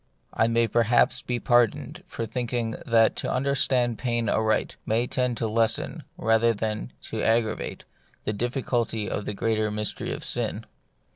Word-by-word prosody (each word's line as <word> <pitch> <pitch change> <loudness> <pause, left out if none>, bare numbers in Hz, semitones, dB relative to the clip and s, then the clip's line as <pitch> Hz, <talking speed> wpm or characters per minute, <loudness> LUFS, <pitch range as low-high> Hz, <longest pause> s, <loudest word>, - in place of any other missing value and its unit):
I 110 - +2
may 115 0 +2
perhaps 120 +1 +3
be 125 -1 -2
pardoned 140 +8 +1
for 115 - -4
thinking 120 0 -2 0.2
that 115 -1 +4
to - - -2
understand 130 -3 +2
pain 120 -2 0
aright 110 0 +1
may 115 +2 +1
tend 125 -1 -1
to 115 - -1
lessen, 115 +1 0 0.2
rather 115 +1 +3
than 105 - -3
to - - -4
aggravate, 115 -1 0 0.4
the 105 - -1
difficulty 120 -2 -1
of 105 - -3
the 105 - -3
greater 110 0 0
mystery 105 0 -2
of - - -5
sin. - - -2
115 Hz, 150 wpm, -26 LUFS, 110-120 Hz, 0.4 s, that